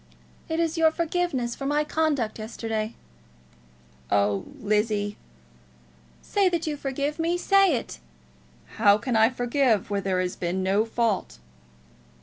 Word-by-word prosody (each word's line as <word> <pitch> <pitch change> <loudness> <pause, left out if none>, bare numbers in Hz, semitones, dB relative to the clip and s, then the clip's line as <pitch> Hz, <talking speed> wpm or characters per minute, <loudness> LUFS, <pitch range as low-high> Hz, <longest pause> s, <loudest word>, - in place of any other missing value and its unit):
"It 320 0 -1
is 330 0 0
your 320 -1 +6
forgiveness 320 -7 -1
for 275 - -5
my 295 +1 +2
conduct 295 -8 -1
yesterday." 220 0 -4 1.1
"Oh, 100 -1 +1
Lizzie!" 210 0 0 1.1
"Say 400 -2 +2
that 340 -1 -1
you 305 -2 -2
forgive 285 +2 -3
me. 335 +2 +1
Say 390 -3 +4
it!" 145 - -5 0.8
"How 205 -2 +5
can 240 +3 -2
I 220 +1 +5
forgive 245 -4 +1
where 200 -1 0
there 190 -1 0
has 180 -1 -2
been 180 +2 -2
no 200 +3 +2
fault?" 225 - -1
235 Hz, 130 wpm, -25 LUFS, 205-315 Hz, 1.1 s, your